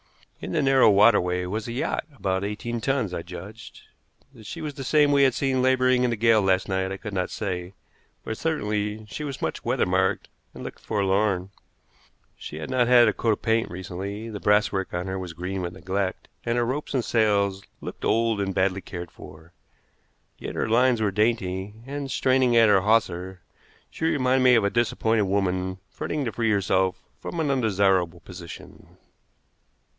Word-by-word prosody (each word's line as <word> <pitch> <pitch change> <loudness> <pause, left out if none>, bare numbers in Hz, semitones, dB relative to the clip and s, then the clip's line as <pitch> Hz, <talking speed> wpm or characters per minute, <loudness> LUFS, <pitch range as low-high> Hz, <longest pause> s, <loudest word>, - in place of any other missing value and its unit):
In - - -6
the 155 -3 +1
narrow 135 -4 +5
waterway 90 -4 +4
was 105 +5 -4
a - - -4
yacht, 125 - -2
about 95 -3 -1
eighteen 115 +3 -4
tons, 130 -8 0
I 85 - -3
judged. 95 +6 -10 0.5
That 110 -5 -13
she 165 - -6
was 155 -2 -4
the 135 - -7
same 145 +2 +3
we 140 -1 +4
had 130 -3 +4
seen 135 -2 +1
laboring 130 -1 +3
in 125 - +2
the 120 - 0
gale 115 0 +4
last 95 -1 +1
night 95 -1 -1
I 95 - -4
could 105 0 -7
not 90 -1 -1
say, 90 -3 -4 0.5
but 110 - -5
certainly 105 -8 -2
she 120 +8 -7
was 140 -3 -5
much - - -3
weather - - +1
marked - - 0 0.3
and - - -8
looked - - -8
forlorn. 100 -2 0 0.8
She - - -9
had 80 - -6
not 125 -2 +2
had 120 -2 +7
a - - +2
coat 115 -2 +1
of - - -6
paint 115 0 +1
recently, 95 +4 -6
the 105 - -6
brasswork 105 -2 +1
on 90 +1 -2
her 95 0 -3
was 90 -2 -6
green 90 +3 -4
with 85 -1 -4
neglect, 95 +2 -3 0.2
and 115 +1 -1
her 120 - +2
ropes 140 +4 -3
and 125 - 0
sails 100 -3 +1 0.2
looked - - -8
old 115 -2 +1
and 95 -2 -2
badly 95 0 +1
cared 90 -2 -8
for. 80 +3 -14 0.9
Yet - - -6
her - - -1
lines 120 +1 +3
were 105 -2 +1
dainty, 105 -2 -1
and, 140 0 -5
straining 130 -2 +2
at 115 -2 +6
her 100 -2 +5
hawser, 95 -4 0 0.5
she - - -4
reminded 130 -4 +2
me 125 -1 +7
of 115 - +3
a 100 - +1
disappointed 115 -2 +1
woman 95 -1 -1
fretting 150 -2 -3
to 115 - -2
free 115 -1 0
herself 95 -2 +1 0.2
from 170 - -6
an 150 -3 +1
undesirable 95 -8 +1
position. 90 -2 -12
105 Hz, 185 wpm, -25 LUFS, 95-120 Hz, 0.9 s, had